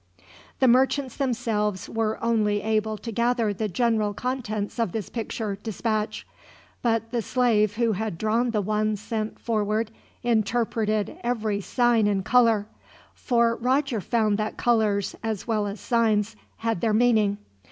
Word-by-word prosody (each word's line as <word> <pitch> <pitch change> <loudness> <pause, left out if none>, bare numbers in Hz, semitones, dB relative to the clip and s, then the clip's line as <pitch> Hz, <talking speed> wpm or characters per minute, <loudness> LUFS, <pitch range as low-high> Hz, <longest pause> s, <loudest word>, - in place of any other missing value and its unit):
The 260 - +4
merchants 260 +1 +3
themselves 225 -7 -1
were 220 -1 -1
only 210 -3 +1
able 215 0 0
to 230 - -6
gather 235 -1 +1
the 215 +2 -2
general 215 0 +1
contents 235 -4 -3
of 225 -7 0
this 220 -4 -4
picture 220 -3 -4
dispatch, 215 0 -2 0.6
but 230 -1 0
the 240 -2 0
slave 215 -4 +2
who 230 0 +2
had 215 -3 -3
drawn 225 +5 +1
the 215 -3 0
one 215 +1 0
sent 215 +1 -4
forward 215 0 -1 0.3
interpreted 220 -2 0
every 220 -4 -1
sign 240 0 +2
and 195 -2 0
color; 230 -4 +4 0.5
for 235 -2 +1
Roger 255 -1 0
found 215 +1 +1
that 215 0 -3
colors, 215 -4 +1
as 220 -4 -3
well 215 -3 0
as 200 +1 -5
signs, 225 -2 +1 0.2
had 225 -5 -2
their 220 -2 +2
meaning. 215 -3 +3
220 Hz, 140 wpm, -25 LUFS, 210-235 Hz, 0.6 s, The